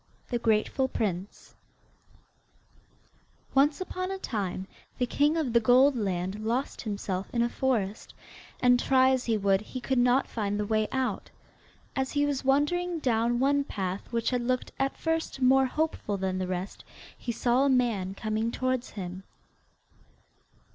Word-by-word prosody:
THE 240 Hz, -, 0 dB
GRATEFUL 225 Hz, +4 st, +1 dB
PRINCE 195 Hz, -5 st, -4 dB, 2.0 s
Once 285 Hz, +2 st, +3 dB
upon 370 Hz, 0 st, -4 dB
a 385 Hz, -, -3 dB
time 195 Hz, -, -3 dB, 0.3 s
the 250 Hz, -, +1 dB
king 290 Hz, +6 st, +2 dB
of 280 Hz, -8 st, -1 dB
the 235 Hz, -, +6 dB
Goldland 215 Hz, -6 st, +2 dB
lost 240 Hz, +5 st, -2 dB
himself 200 Hz, -3 st, -3 dB
in 235 Hz, -1 st, +1 dB
a 235 Hz, -, +1 dB
forest, 230 Hz, -6 st, -2 dB, 0.5 s
and 245 Hz, -1 st, +5 dB
try 260 Hz, 0 st, +4 dB
as 260 Hz, -1 st, 0 dB
he 225 Hz, -2 st, +1 dB
would 195 Hz, -1 st, +2 dB
he 255 Hz, +4 st, -7 dB
could 260 Hz, 0 st, 0 dB
not 250 Hz, +2 st, +4 dB
find 205 Hz, -2 st, -2 dB
the 210 Hz, -, 0 dB
way 215 Hz, 0 st, +1 dB
out. 260 Hz, -1 st, -2 dB, 0.7 s
As 265 Hz, 0 st, -1 dB
he 290 Hz, -1 st, +2 dB
was 285 Hz, -2 st, -1 dB
wandering 330 Hz, +6 st, +1 dB
down 240 Hz, -4 st, +1 dB
one 280 Hz, +2 st, +3 dB
path 190 Hz, -7 st, -4 dB
which 230 Hz, +1 st, 0 dB
had 250 Hz, -1 st, 0 dB
looked 255 Hz, +1 st, -1 dB
at 270 Hz, 0 st, 0 dB
first 325 Hz, -3 st, -2 dB
more 265 Hz, +1 st, +5 dB
hopeful 305 Hz, -8 st, -2 dB
than 190 Hz, -1 st, -2 dB
the 185 Hz, -, -2 dB
rest 185 Hz, +1 st, -4 dB, 0.3 s
he 240 Hz, -, -4 dB
saw 240 Hz, +3 st, +2 dB
a -, -, +3 dB
man 225 Hz, -8 st, +1 dB
coming 220 Hz, +2 st, -1 dB
towards 255 Hz, +1 st, -1 dB
him. 185 Hz, -2 st, -6 dB
245 Hz, 155 wpm, -28 LUFS, 210-270 Hz, 2.0 s, the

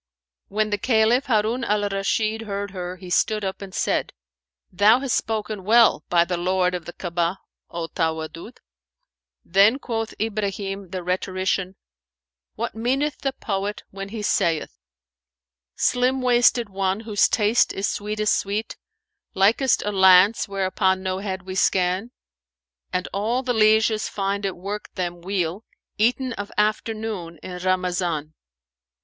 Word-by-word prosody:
When 215 Hz, +1 st, -1 dB
the 205 Hz, -, 0 dB
Caliph 235 Hz, +3 st, +3 dB
Harun 225 Hz, +1 st, +1 dB
al 210 Hz, -2 st, +1 dB
Rashid 215 Hz, +3 st, -1 dB
heard 200 Hz, -2 st, -4 dB
her, 180 Hz, -1 st, -5 dB
he 180 Hz, -1 st, -10 dB
stood 215 Hz, +3 st, +1 dB
up 190 Hz, +1 st, -4 dB
and 195 Hz, -1 st, -8 dB
said, -, -, -1 dB, 0.6 s
"Thou 205 Hz, +6 st, +5 dB
hast 265 Hz, -2 st, -1 dB
spoken 215 Hz, -2 st, -2 dB
well, 225 Hz, -5 st, +5 dB
by 170 Hz, -1 st, +4 dB
the 180 Hz, 0 st, -2 dB
Lord 180 Hz, +1 st, +1 dB
of 175 Hz, -2 st, -4 dB
the 175 Hz, -, -8 dB
Ka'abah, 175 Hz, 0 st, -2 dB, 0.3 s
O 170 Hz, -1 st, -4 dB
Tawaddud!" 165 Hz, +6 st, -4 dB, 0.9 s
Then 200 Hz, +7 st, +5 dB
quoth 225 Hz, -5 st, -4 dB
Ibrahim 200 Hz, -3 st, -3 dB
the 185 Hz, 0 st, -5 dB
rhetorician, 185 Hz, +1 st, -1 dB, 0.8 s
"What -, -, -3 dB
meaneth 265 Hz, +6 st, -1 dB
the 270 Hz, -, -1 dB
poet 200 Hz, -3 st, -3 dB
when 195 Hz, 0 st, -7 dB
he 215 Hz, 0 st, -6 dB
saith, 165 Hz, -5 st, 0 dB, 1.0 s
'Slim 255 Hz, +1 st, +1 dB
wasted 245 Hz, -1 st, +4 dB
one, 195 Hz, +1 st, -1 dB
whose 215 Hz, -3 st, +2 dB
taste 220 Hz, +1 st, +3 dB
is 195 Hz, -, -2 dB
sweetest 210 Hz, 0 st, 0 dB
sweet, 205 Hz, +3 st, -3 dB, 0.3 s
* -, -, -58 dB
Likest 225 Hz, +7 st, +3 dB
a 210 Hz, -, -1 dB
lance 190 Hz, +3 st, +5 dB
whereon 190 Hz, -1 st, 0 dB
no 185 Hz, 0 st, -2 dB
head 190 Hz, -2 st, -4 dB
we 185 Hz, 0 st, -6 dB
scan: 185 Hz, +3 st, +1 dB, 0.8 s
And 180 Hz, 0 st, -1 dB
all 225 Hz, +6 st, 0 dB
the 250 Hz, -1 st, 0 dB
lieges 220 Hz, 0 st, +3 dB
find 200 Hz, 0 st, -2 dB
it 190 Hz, -, -5 dB
work 200 Hz, +3 st, -5 dB
them 175 Hz, -2 st, -3 dB
weal, 185 Hz, +1 st, -2 dB, 0.2 s
* -, -, -69 dB
Eaten 250 Hz, +3 st, +1 dB
of 205 Hz, -2 st, -6 dB
afternoon 215 Hz, -4 st, -1 dB
in 180 Hz, -1 st, -6 dB
Ramazan.'" 180 Hz, -4 st, -1 dB
200 Hz, 145 wpm, -23 LUFS, 185-220 Hz, 1.0 s, Thou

